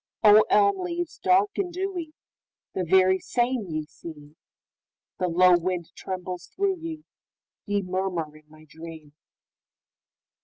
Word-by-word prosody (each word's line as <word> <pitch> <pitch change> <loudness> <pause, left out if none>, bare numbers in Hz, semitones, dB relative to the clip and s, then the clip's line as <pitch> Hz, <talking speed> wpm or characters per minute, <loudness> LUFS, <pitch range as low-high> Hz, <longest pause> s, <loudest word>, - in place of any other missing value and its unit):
O, 210 0 +8
elm 400 -1 +4
leaves 350 -1 -4
dark 385 +3 +3
and 375 -3 -1
dewy, 355 -3 -4 0.6
The 185 - -1
very 185 +2 +4
same 240 -2 -1
ye 155 -2 -3
seem, 150 -1 -12 0.8
The 180 - +1
low 180 +1 +5
wind 175 -1 -3
trembles 180 -1 -6
through 390 -1 -1
ye, 320 -2 -7 0.6
Ye 205 -1 0
murmur 180 -4 -3
in 155 0 -19
my 155 0 -17
dream! 160 -2 -11
185 Hz, 125 wpm, -26 LUFS, -, 0.8 s, O